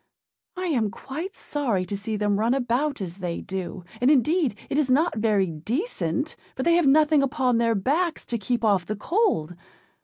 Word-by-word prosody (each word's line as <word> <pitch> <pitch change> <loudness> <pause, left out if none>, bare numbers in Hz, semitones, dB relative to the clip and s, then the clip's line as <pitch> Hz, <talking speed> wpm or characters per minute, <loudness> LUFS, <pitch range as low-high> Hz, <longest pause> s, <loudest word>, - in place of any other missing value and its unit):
I 370 - -2
am 245 - +1
quite 310 - -6
sorry 235 -11 -1
to 200 - -4
see 210 +2 -3
them 205 -1 +1
run 230 +4 +2
about 265 +1 0
as 180 -1 -5
they 175 -3 -3
do; 185 -1 -5 0.2
and 250 - +4
indeed 300 - +3
it 285 - 0
is 285 -4 +1
not 305 +7 +3
very 210 -3 +2
decent, 215 - -2 0.2
for 260 - -2
they 340 - +4
have 340 -3 +4
nothing 300 +1 +5
upon 260 -4 +1
their 230 -1 +2
backs 310 - 0
to 235 - -3
keep 235 +3 -1
off 195 -4 +2
the 215 - -2
cold. 330 - 0
245 Hz, 185 wpm, -25 LUFS, 200-300 Hz, 0.2 s, nothing